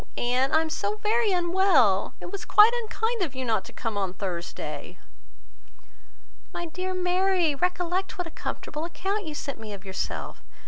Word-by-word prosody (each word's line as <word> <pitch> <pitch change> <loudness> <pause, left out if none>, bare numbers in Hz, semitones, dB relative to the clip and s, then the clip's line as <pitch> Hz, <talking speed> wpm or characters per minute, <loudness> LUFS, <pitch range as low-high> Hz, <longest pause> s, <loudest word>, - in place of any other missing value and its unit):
Anne, 250 +2 +1
I 315 - +5
am 320 -1 -3
so 410 +6 -1
very 435 +1 +2
unwell! 345 - +3
It - - -8
was 400 - -5
quite 420 +2 +7
unkind 450 0 -1
of 300 -7 -1
you 260 0 -3
not 225 -2 +1
to - - -10
come 225 -4 -3
on 190 -2 -2
Thursday." 175 -3 -5 1.5
"My 345 - -4
dear 370 +3 -3
Mary, 365 -2 +2
recollect 360 +4 -1
what 360 - -2
a 330 - -8
comfortable 300 0 -5
account 385 +3 -2
you 305 - -5
sent 280 -4 -5
me 215 -2 -7
of 195 -1 -10
yourself! 190 -1 -4
340 Hz, 170 wpm, -27 LUFS, 240-380 Hz, 1.5 s, quite